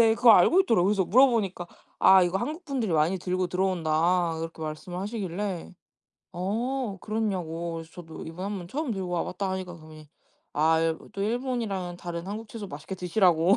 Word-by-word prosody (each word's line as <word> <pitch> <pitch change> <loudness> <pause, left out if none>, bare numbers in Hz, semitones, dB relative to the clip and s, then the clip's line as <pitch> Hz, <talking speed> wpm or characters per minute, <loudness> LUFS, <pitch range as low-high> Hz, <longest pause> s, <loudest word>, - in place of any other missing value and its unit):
네. 225 -1 +6
그걸 235 -1 +7
알고 320 - +6
있더라고. 230 - +3
그래서 200 -1 +2
물어보니까 215 -5 +3 0.3
"아. 190 -1 +7
이거 175 +1 +1
한국 305 - -4
분들이 255 - -1
많이 160 +4 +2
들고 185 +1 -1
들어온다." 175 -1 +1
이렇게 165 0 -6
말씀을 155 +3 -5
하시길래 195 -3 -4 0.6
어. 220 +5 -2
그렇냐고 180 -6 -2
그래서 165 0 -7
저도 165 -3 -9
"이번 165 +3 -7
한번 195 -4 -4
처음 285 - -2
들고 190 -3 -4
와 175 -1 -1
봤다." 190 +1 -3
하니까 185 -1 -4
그분이 155 -2 -13 0.5
아 160 +2 +4
일 165 -1 +1
또 195 - -3
일본이랑은 220 -6 -2
다른 170 0 -6
한국 215 +3 -5
채소 215 -2 -7
맛있게 150 +2 -7
드시라고 180 -1 +3
185 Hz, 405 characters per minute, -27 LUFS, 170-215 Hz, 0.6 s, 그걸